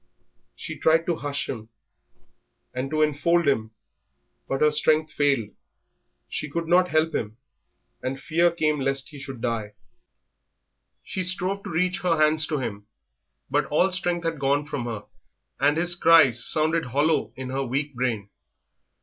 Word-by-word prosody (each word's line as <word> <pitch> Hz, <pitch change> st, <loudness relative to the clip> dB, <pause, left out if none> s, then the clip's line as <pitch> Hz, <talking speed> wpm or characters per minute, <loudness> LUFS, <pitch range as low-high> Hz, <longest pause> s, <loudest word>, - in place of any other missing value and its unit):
She -, -, -7 dB
tried 165 Hz, +1 st, +3 dB
to 170 Hz, -2 st, -1 dB
hush 145 Hz, -1 st, -3 dB
him 110 Hz, -3 st, -6 dB, 1.0 s
and 130 Hz, +2 st, -3 dB
to 155 Hz, +1 st, +2 dB
enfold 155 Hz, +3 st, +2 dB
him, 110 Hz, -6 st, +1 dB, 0.8 s
but 135 Hz, -, -2 dB
her 150 Hz, 0 st, +5 dB
strength 155 Hz, +1 st, +2 dB
failed, 140 Hz, -7 st, +1 dB, 0.8 s
she 150 Hz, -, -5 dB
could 165 Hz, +3 st, -3 dB
not 180 Hz, +1 st, +4 dB
help 160 Hz, +1 st, +1 dB
him, 110 Hz, +1 st, -3 dB, 0.6 s
and 135 Hz, +1 st, -3 dB
fear 170 Hz, +4 st, +2 dB
came 155 Hz, -3 st, 0 dB
lest 135 Hz, 0 st, -2 dB
he 145 Hz, -, -11 dB
should 135 Hz, -3 st, -8 dB
die. 115 Hz, -3 st, -2 dB, 1.3 s
She 190 Hz, -, -3 dB
strove 185 Hz, +2 st, -2 dB
to -, -, -5 dB
reach 180 Hz, +3 st, 0 dB
her 180 Hz, -4 st, +1 dB
hands 155 Hz, +1 st, +3 dB
to 155 Hz, -, -1 dB
him, 105 Hz, -6 st, -5 dB, 0.6 s
but 145 Hz, +1 st, +1 dB
all 180 Hz, +6 st, +2 dB
strength 175 Hz, -2 st, -1 dB
had 165 Hz, -2 st, -2 dB
gone 140 Hz, +2 st, +1 dB
from 140 Hz, -4 st, -4 dB
her, 115 Hz, -3 st, -5 dB, 0.5 s
and 145 Hz, +2 st, +3 dB
his 175 Hz, +1 st, +4 dB
cries 160 Hz, -9 st, +5 dB
sounded 160 Hz, 0 st, +2 dB
hollow 145 Hz, +6 st, +1 dB
in 130 Hz, -1 st, -6 dB
her 135 Hz, +1 st, -1 dB
weak 140 Hz, +3 st, -2 dB
brain. 115 Hz, -5 st, -2 dB
150 Hz, 155 wpm, -25 LUFS, 130-165 Hz, 1.3 s, her